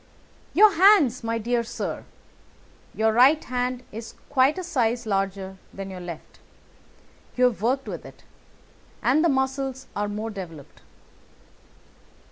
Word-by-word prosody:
"Your 420 +2 +7
hands, 330 - +5
my 230 0 -1
dear 235 +1 0
sir. 230 - -5 0.9
Your 220 0 +2
right 270 +7 +5
hand 250 0 -2
is 225 +1 -8 0.2
quite 275 +3 +3
a 370 - -3
size 245 -9 0
larger 195 -2 -2
than 195 0 -7
your 185 - -7
left. 175 -3 -9 1.0
You 250 - +2
have 245 -5 +2
worked 260 +4 0
with - - -6
it, - - -14 0.8
and 285 +6 +3
the 340 - +4
muscles 265 -1 -1
are 205 0 -1
more 215 +2 -4
developed." 165 -8 -10
240 Hz, 130 wpm, -25 LUFS, 205-265 Hz, 1.0 s, Your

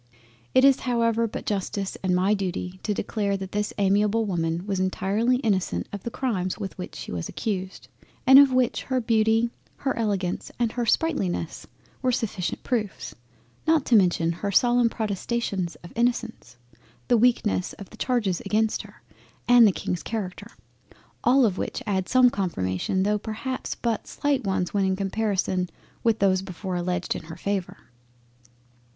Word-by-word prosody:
It 260 +1 +7
is 275 -1 +6
however 230 -2 +1
but - - -6
Justice, 200 -1 -2
and 185 -1 +1
my 190 +3 +3
Duty 185 -2 -3
to 215 - -2
declare 200 -1 -1
that 190 -1 -7
this 210 0 -1
amiable 205 +3 +2
Woman 170 -2 -1
was 195 -2 -1
entirely 195 +6 +1
innocent 195 -6 0
of 200 - -5
the 235 - -4
Crimes 210 -8 -2
with 195 -3 -5
which 180 - -7
she - - -7
was 85 -2 -4
accused, 190 -3 -4 0.4
and 265 +2 +9
of 280 -2 +7
which 255 -1 +1
her 260 -1 0
Beauty, 225 0 +2 0.2
her 270 - -2
Elegance, 200 -6 -2
and 235 -2 +1
her 240 -1 -2
Sprightliness 205 - 0 0.3
were 255 - +2
sufficient 210 -7 -2
proofs, 215 -6 -2 0.5
not 315 -3 +3
to 240 - +4
mention 175 -4 +3
her 200 +4 -3
solemn 240 +3 +4
Protestations 205 -4 -2
of 170 - -11
Innocence, 235 - -1 0.5
the 245 - +4
weakness 225 -5 +2
of 200 - -11
the - - -13
Charges 220 -9 0
against 220 +1 0
her, - - -16 0.4
and 245 -2 +8
the - - +4
King's 180 -1 -3
Character; 205 -5 -5 0.7
all 260 +1 +5
of 195 -4 0
which - - -3
add 190 -2 -1
some 255 -1 +5
confirmation, 175 - -1
tho' 210 +1 +1
perhaps 225 +5 -4
but 230 -2 -2
slight 285 -3 0
ones 190 -2 -1
when 200 -1 +2
in 190 0 +1
comparison 195 -2 -1 0.3
with 230 -2 +3
those 190 -2 +3
before 190 0 -5
alledged 180 0 -1
in - - -7
her 160 +1 -9
favour. 195 0 -3
205 Hz, 160 wpm, -25 LUFS, 185-235 Hz, 0.7 s, and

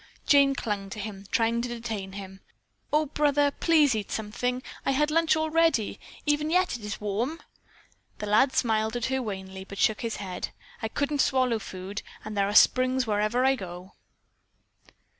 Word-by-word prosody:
Jane 280 -1 +5
clung 205 -5 -3
to 210 - -7
him, 200 -1 -7
trying 230 +1 +1
to 245 - -2
detain 225 -5 -5
him. 195 -1 -8 0.5
"Oh, 305 +1 +3
brother, 290 0 +2
please 305 -4 +3
eat 215 -2 -3
something. 245 +4 -2 0.2
I 275 - +1
had 300 +3 +2
lunch 325 0 +3
all 315 0 -1
ready. 325 -9 +2 0.3
Even 295 +1 +1
yet 365 +2 +2
it 230 - -9
is 210 0 -5
warm." 225 +10 -2 0.8
The - - -5
lad 215 +6 +4
smiled 220 -1 +1
at 240 - -1
her 265 - +1
wanly, 190 -4 -6
but 200 +1 -10
shook 215 +1 +2
his 230 -1 -2
head. 185 -3 -5 0.3
"I 220 - -1
couldn't 285 +4 0
swallow 255 -4 +2
food, 195 0 -6 0.2
and 215 0 -5
there 200 0 +1
are 205 - -3
springs 255 +2 +5
wherever 215 +4 +1
I 265 - +5
go." 180 -3 -9
230 Hz, 175 wpm, -27 LUFS, 205-280 Hz, 0.8 s, Jane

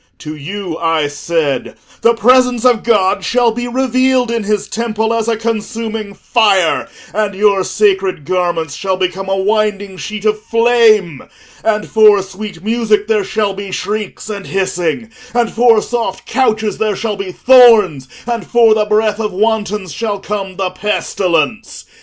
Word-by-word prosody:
To 155 0 -8
you, 175 +3 -6
I 165 -2 +1
said, 145 -2 -2 0.3
the 235 0 +3
presence 250 +1 +3
of 245 -3 +4
God 200 -4 +1
shall 240 +3 +2
be 240 +2 -4
revealed 255 0 +1
in 230 -3 -2
his 210 -1 -1
temple 225 -1 -2
as 230 -1 -1
a 230 -1 0
consuming 220 -1 -4
fire, 200 -8 +1 0.2
and 205 -1 -1
your 200 -1 +2
sacred 195 -7 0
garments 175 -4 -1
shall 190 +2 -2
become 190 +1 -3
a 195 - 0
winding 205 -1 -1
sheet 210 +2 -6
of 215 0 +1
flame, 225 - +2 0.4
and 215 -1 0
for 210 -3 +5
sweet 195 -2 -9
music 215 -2 +1
there 215 -2 +1
shall 205 0 -1
be 200 0 -7
shrieks 210 +3 -4
and 205 -2 -6
hissing, 190 +3 -2 0.2
and 235 -1 +1
for 230 -2 +3
soft 240 -1 -3
couches 220 -4 0
there 215 -2 0
shall 215 +1 -3
be 195 -2 -5
thorns, 220 - +5 0.2
and 230 -5 -3
for 230 -2 +4
the 215 -1 +1
breath 215 0 +1
of 210 -2 -2
wantons 210 -2 -1
shall 210 -3 -3
come 195 -2 -5
the 185 -1 -2
pestilence. 185 -1 -2
210 Hz, 155 wpm, -15 LUFS, 190-225 Hz, 0.4 s, for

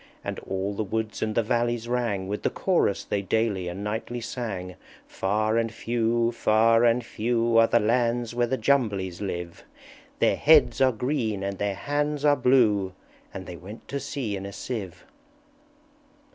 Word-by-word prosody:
And - - -4
all 95 +1 -3
the 110 - -2
woods 110 +1 -3
and 110 -1 -1
the 115 - +2
valleys 120 0 0
rang 115 -6 -1
With 105 +1 -3
the - - +1
Chorus - - +1
they 100 - -2
daily 100 -2 0
and 90 +3 -5
nightly 110 +3 -3
sang, 110 -6 -5 0.3
"_Far 110 +3 0
and 115 -1 -3
few, 115 0 0
far 115 0 +3
and 120 0 +3
few, 115 0 +1
Are 115 - +6
the 120 - +3
lands 120 +1 +1
where 120 0 +1
the 130 - -1
Jumblies 105 -12 0
live; 90 -3 -5 0.5
Their - - +2
heads 145 -6 +5
are 130 -1 +5
green, 115 -4 -2
and 100 -1 -4
their 100 -1 -1
hands 145 +5 -1
are 145 -1 +6
blue, 110 -8 +3 0.4
And 95 - -7
they 90 -1 -8
went 105 +6 -11
to 140 - -2
sea 135 -6 -3
in 100 0 -5
a 100 - -8
sieve. 100 -5 -6
115 Hz, 170 wpm, -26 LUFS, 100-120 Hz, 0.5 s, Are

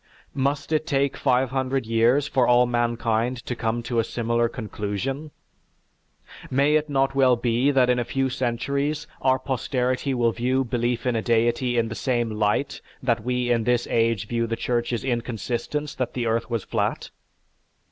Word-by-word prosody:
Must 140 +3 -1
it 155 0 +1
take 140 -2 +1
five 130 -1 +1
hundred 130 -1 -1
years 115 +5 +3
for 130 -4 +2
all 125 0 +5
mankind 120 0 0
to 125 - -3
come 115 0 -2
to 115 0 -1
a - - +3
similar 115 +1 0
conclusion? 115 +7 -4 1.2
May 140 +3 +3
it 155 0 +2
not 135 -1 +1
well 130 -2 +4
be 120 +3 +1
that 130 -3 +4
in 125 0 +2
a - - +1
few 135 +3 -1
centuries 140 +4 -1 0.2
our 130 0 +3
posterity 130 0 -1
will 120 -1 +2
view 130 +4 0
belief 120 0 -1
in 125 -2 +1
a 110 - 0
deity 120 +2 +1
in 115 -1 +2
the - - -4
same 120 -3 -1
light 105 +5 0 0.2
that 120 -3 +1
we 125 0 0
in 115 -2 +2
this 120 +1 +1
age 115 -3 +1
view 115 0 -1
the 115 - -1
Church's 120 0 -1
insistence 125 +4 -3
that 130 - -3
the 120 -2 -1
earth 115 0 0
was 115 -4 -2
flat? - - -2
125 Hz, 170 wpm, -24 LUFS, 115-135 Hz, 1.2 s, all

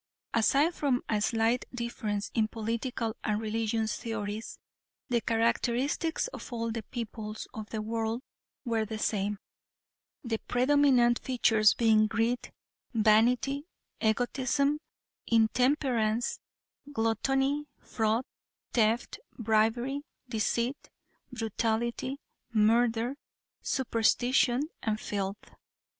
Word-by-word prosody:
Aside 280 +9 +3
from 275 -6 0
a 210 -2 0
slight 225 +2 +1
difference 220 -4 -3
in 220 -2 +2
political 225 +1 -3
and 210 -1 0
religious 220 0 -1
theories, 220 -1 -4 0.5
the 240 -2 +2
characteristics 240 - +1
of - - -9
all 230 -1 -2
the 225 0 -3
peoples 220 -1 -6
of 215 -1 -7
the 215 -1 -3
world 225 +2 -2 0.4
were 225 -2 +1
the 215 0 -5
same; 205 -1 -1 0.9
the 225 -3 -2
predominant 250 -2 +4
features 220 -4 +3
being 220 -2 +4
greed, 230 +3 -1 0.4
vanity, 235 +7 +3 0.3
egotism, 260 +5 +1 0.5
intemperance, 235 0 +2 0.5
gluttony, 270 +5 +1
fraud, 225 +2 0 0.5
theft, 225 0 +1 0.2
bribery, 230 +5 +1 0.3
deceit, 235 +3 -1 0.4
brutality, 235 +3 -1 0.3
murder, 230 +3 +2 0.4
superstition 245 +1 +2 0.2
and 215 -1 -1
filth. 200 -1 -4
230 Hz, 90 wpm, -30 LUFS, 220-250 Hz, 0.9 s, predominant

